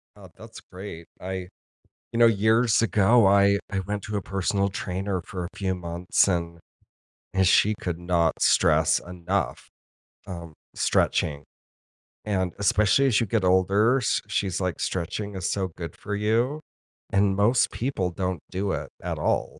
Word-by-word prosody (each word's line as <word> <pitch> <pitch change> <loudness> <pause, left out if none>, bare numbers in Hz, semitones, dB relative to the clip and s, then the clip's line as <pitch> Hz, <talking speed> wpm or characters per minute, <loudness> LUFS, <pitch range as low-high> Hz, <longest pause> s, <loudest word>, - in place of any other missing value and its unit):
Oh, 95 -3 -14
that's 115 +1 -12
great. 90 -3 -9
I 95 0 -5 0.7
you 115 - -2
know, 120 - +7
years 110 +1 +3
ago, 110 +2 +4
I 100 0 +5
I 95 - -1
went 100 +2 -4
to 105 0 -4
a 100 - -2
personal 100 +1 -1
trainer 95 0 -3
for 90 +1 -6
a 85 - -5
few 95 -2 -1
months 85 +1 0
and 85 -2 -2 0.8
and 95 -1 +3
she 105 +3 +4
could 85 -2 -3
not 85 -2 +1
stress 80 0 +4
enough, 90 +2 -3 0.6
um, 85 -3 -8 0.2
stretching. 75 -1 0 0.8
And, 95 -4 -1
especially 105 +6 +3
as 115 -3 +3
you - - +1
get 105 -1 0
older, 100 +7 +3
she's 95 -2 -1
like, 90 -2 -2
"Stretching 100 +3 -3
is 95 - -2
so 95 -2 -1
good 85 -2 -6
for 105 - -6
you 115 +8 0 0.5
and 100 0 +2
most 115 +4 +3
people 110 -8 -2
don't 90 -1 -3
do 95 +1 -2
it, - - -4
at - - -4
all," - - -1
95 Hz, 155 wpm, -25 LUFS, 90-105 Hz, 0.8 s, know